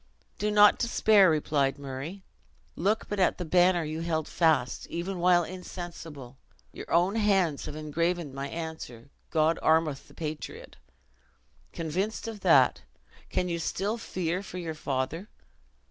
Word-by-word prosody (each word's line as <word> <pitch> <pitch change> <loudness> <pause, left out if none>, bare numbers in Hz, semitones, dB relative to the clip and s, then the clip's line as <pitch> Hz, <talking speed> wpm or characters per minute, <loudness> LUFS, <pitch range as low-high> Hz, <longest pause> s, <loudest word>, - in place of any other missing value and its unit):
"Do 210 - 0
not 210 0 +6
despair," 215 -5 +5
replied 145 -3 +1
Murray; 140 +7 -7 0.5
"look 205 +6 0
but 205 - -3
at 185 - +3
the 180 - -4
banner 175 +1 +4
you 155 +1 -4
held 160 -2 -1
fast, 160 -7 +1
even 180 +2 -4
while 175 0 +4
insensible; 165 -7 -8 0.3
your - - -9
own 180 +6 +3
hands 195 -8 +2
have 150 - -6
engraven 155 0 -2
my 135 +1 -4
answer 160 -7 -7 0.2
God 160 0 +2
armeth 160 -3 +2
the - - -18
patriot! 155 -1 -6 1.0
Convinced 185 +8 -3
of 225 -2 -6
that, - - +4 0.5
can 180 - 0
you 170 -1 -2
still 205 +7 -2
fear 180 -4 -2
for 190 -2 -8
you 165 -3 -4
father? 155 +5 -3
170 Hz, 140 wpm, -28 LUFS, 155-185 Hz, 1.0 s, not